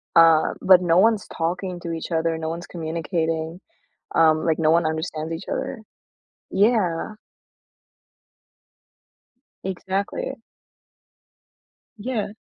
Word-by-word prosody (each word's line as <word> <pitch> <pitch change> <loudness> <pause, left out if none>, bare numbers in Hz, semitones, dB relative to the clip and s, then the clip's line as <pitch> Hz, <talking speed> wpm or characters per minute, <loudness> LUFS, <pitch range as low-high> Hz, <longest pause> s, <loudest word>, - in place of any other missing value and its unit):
uh, 165 -1 +6
but 185 -1 +7
no 170 -1 +3
one's 220 -1 +3
talking 180 +2 -3
to 170 -1 -5
each 165 +2 -5
other, 165 0 0
no 160 0 -3
one's 170 +1 -6
communicating, 165 0 -3 0.6
um, 160 -1 +4
like, 160 0 +1
no 155 -1 +3
one 170 0 +3
understands 160 0 -3
each 165 +4 -7
other? 245 -5 -3 0.7
Yeah. 205 -2 +1 2.5
Exactly. 190 +6 -3 1.6
Yeah. 220 -1 -2
170 Hz, 100 wpm, -23 LUFS, 160-190 Hz, 2.5 s, but